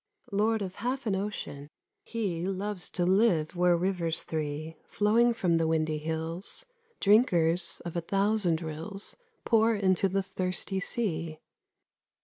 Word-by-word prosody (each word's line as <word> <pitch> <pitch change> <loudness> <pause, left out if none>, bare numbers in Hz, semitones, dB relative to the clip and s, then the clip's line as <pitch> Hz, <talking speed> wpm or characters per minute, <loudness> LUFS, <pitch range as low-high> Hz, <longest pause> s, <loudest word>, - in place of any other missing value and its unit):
Lord 215 +1 +1
of 185 -1 -6
half 260 +2 -2
an 205 -3 +1
ocean, 190 -8 -5 0.3
he 190 - -2
Loves 195 0 -4
to 175 - -1
live 185 -5 +3
where 175 0 +4
rivers 170 -2 -1
three, 155 0 -4
Flowing 225 +3 +3
from 180 -8 +1
the 165 -1 +1
windy 155 -1 0
hills, 160 +4 -4 0.3
Drinkers 180 -6 +3
of 170 - -5
a 170 - 0
thousand 195 -2 +1
rills, 165 +6 -6 0.3
Pour 225 -1 +4
into 190 -1 +2
the 195 +1 0
thirsty 185 +1 -2
sea. 170 -7 -3
185 Hz, 130 wpm, -29 LUFS, 165-210 Hz, 0.3 s, where